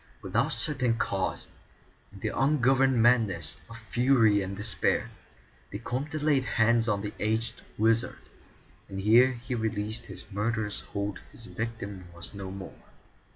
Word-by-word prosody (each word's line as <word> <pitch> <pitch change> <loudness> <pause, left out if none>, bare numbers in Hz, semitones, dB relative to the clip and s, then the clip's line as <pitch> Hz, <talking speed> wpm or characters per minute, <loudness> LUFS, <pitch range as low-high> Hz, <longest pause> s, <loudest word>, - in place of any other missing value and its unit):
Without - - +1
certain 130 -6 0
cause, 95 -3 -2 0.6
in 100 - -13
the - - 0
ungoverned 135 -2 +3
madness 110 -10 +2
of 115 - -9
fury 115 -1 +3
and 95 0 -4
despair, 110 +1 0 0.6
the - - -5
Comte 140 +5 -4
laid 145 -4 +3
hands 115 0 +3
on 100 -1 0
the 105 - -4
aged 110 +2 -1 0.2
wizard, 115 +3 +2 0.7
and 95 - -5
ere 120 +6 +6
he 120 +1 -6
released 110 -1 -2
his 95 -2 -8
murderous 105 0 -1
hold 100 0 -4
his 115 - -12
victim 105 -6 -5
was 85 +3 -8
no 100 -1 -6
more. 95 -1 -10
110 Hz, 140 wpm, -28 LUFS, 100-120 Hz, 0.7 s, ere